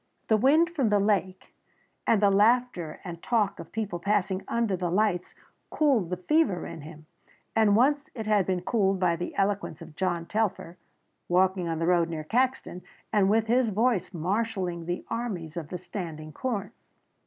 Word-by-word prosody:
The 220 Hz, -, +5 dB
wind 305 Hz, +9 st, +4 dB
from 275 Hz, -10 st, +1 dB
the 210 Hz, -, +3 dB
lake 195 Hz, -2 st, -1 dB, 0.5 s
and 215 Hz, -2 st, +3 dB
the 200 Hz, -, +5 dB
laughter 210 Hz, -5 st, +2 dB
and 170 Hz, -2 st, -7 dB
talk 215 Hz, -4 st, 0 dB
of 170 Hz, -, -10 dB
people 210 Hz, -6 st, -3 dB
passing 195 Hz, 0 st, 0 dB
under 230 Hz, -4 st, 0 dB
the 180 Hz, -1 st, -2 dB
lights 185 Hz, -1 st, 0 dB, 0.3 s
cooled 265 Hz, -, +2 dB
the 180 Hz, -, -2 dB
fever 215 Hz, -, +1 dB
in -, -, -8 dB
him, 155 Hz, +1 st, -12 dB, 0.5 s
as 220 Hz, -2 st, +4 dB
once 280 Hz, +8 st, +3 dB
it 220 Hz, -3 st, -5 dB
had 210 Hz, -3 st, +2 dB
been 185 Hz, -2 st, -1 dB
cooled 195 Hz, -3 st, +1 dB
by 175 Hz, -2 st, +2 dB
the 175 Hz, +1 st, -5 dB
eloquence 195 Hz, -5 st, -1 dB
of 165 Hz, -3 st, -12 dB
John 175 Hz, -2 st, -1 dB
Telfer, 185 Hz, -3 st, -2 dB, 0.5 s
walking 185 Hz, 0 st, +2 dB
on 165 Hz, -1 st, -2 dB
the 165 Hz, -, -1 dB
road 170 Hz, -1 st, +3 dB
near 160 Hz, -2 st, -4 dB
Caxton, 250 Hz, -1 st, -1 dB, 0.3 s
and 200 Hz, -2 st, +4 dB
with 220 Hz, +1 st, +3 dB
his 240 Hz, +1 st, +2 dB
voice 215 Hz, -2 st, +1 dB
marshalling 185 Hz, -1 st, -2 dB
the 175 Hz, 0 st, -3 dB
armies 200 Hz, -10 st, -4 dB
of 165 Hz, -4 st, -5 dB
the 180 Hz, -, -4 dB
standing 165 Hz, -4 st, -7 dB
corn. 210 Hz, -, -3 dB
195 Hz, 175 wpm, -27 LUFS, 175-225 Hz, 0.5 s, The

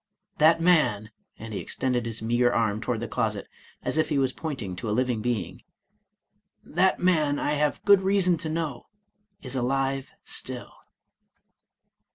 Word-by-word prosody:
That 160 Hz, +2 st, +6 dB
man," 155 Hz, -, +2 dB, 0.3 s
and 110 Hz, 0 st, -8 dB
he -, -, -3 dB
extended 125 Hz, -3 st, -1 dB
his 115 Hz, -1 st, -4 dB
meager 120 Hz, +2 st, +2 dB
arm 110 Hz, -3 st, 0 dB
toward 120 Hz, -3 st, -2 dB
the 115 Hz, -, -3 dB
closet, -, -, -2 dB, 0.4 s
as 155 Hz, -, 0 dB
if 155 Hz, -, +1 dB
he 150 Hz, -, +1 dB
was 130 Hz, -2 st, +1 dB
pointing 130 Hz, -, -5 dB
to 110 Hz, -, -4 dB
a 105 Hz, -, 0 dB
living 125 Hz, -3 st, 0 dB
being; 120 Hz, -2 st, -2 dB, 0.6 s
" -, -, -50 dB, 0.2 s
that 190 Hz, +1 st, +4 dB
man, 155 Hz, -5 st, +2 dB
I 145 Hz, -, -1 dB
have 150 Hz, 0 st, 0 dB
good 200 Hz, -2 st, +7 dB
reason 190 Hz, -2 st, +3 dB
to 160 Hz, 0 st, -5 dB
know, 155 Hz, -5 st, -3 dB, 0.6 s
is 130 Hz, -1 st, -4 dB
alive 135 Hz, +1 st, -1 dB
still." -, -, -5 dB
135 Hz, 160 wpm, -26 LUFS, 115-160 Hz, 0.6 s, good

